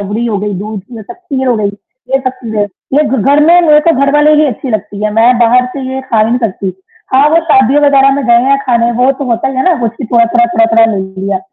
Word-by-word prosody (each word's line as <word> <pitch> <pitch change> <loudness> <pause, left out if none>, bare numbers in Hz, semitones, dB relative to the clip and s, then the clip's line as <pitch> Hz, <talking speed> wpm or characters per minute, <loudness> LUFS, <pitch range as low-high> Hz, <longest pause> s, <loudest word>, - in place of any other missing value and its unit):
रबड़ी 205 +4 -3
हो 220 -3 -2
गई, 205 0 -4
दूध 205 +2 -6
से 225 +2 -12
तब 285 - -11
खीर 280 -8 -5
हो 245 - +2
गई, 210 -1 -1 0.4
ये 270 - +2
सब 255 -1 -2
चीजें। 220 -2 -2 0.3
ये 300 - +4
घ 270 - -1
घर 285 +2 +2
में 350 +1 +5
रहके 310 0 +3
घर 280 0 +2
वाली 300 +1 +4
नहीं 305 0 +3
अच्छी 260 +1 -5
लगती 210 -1 -4
है। 215 - 0
मैं 235 +2 +3
बाहर 245 +1 +3
से 275 - -5
ये 265 - -4
खा 260 -4 -2
ही 215 - +3
नहीं 240 +2 0
सकती। 195 -5 -3 0.4
हाँ, 280 +3 +4
वो 320 - +2
शादियों 270 +1 +3
वग़ैरह 275 -1 +4
में 280 - -2
जाएँ 235 +1 +3
या 275 - +3
खाने, 235 -1 +1
वो 250 +3 +1
तो 275 +1 -6
होता 230 +3 -1
ही, 265 - -6
है 260 - +1
ना? 365 - +3
सब - - -7 0.2
कुछ 235 - -6
थोड़ा-थोड़ा, 235 0 +2
थोड़ा-थोड़ा 225 -1 +2
ले 225 -3 -1 0.2
लिया। 195 0 -2
245 Hz, 265 wpm, -11 LUFS, 225-275 Hz, 0.4 s, में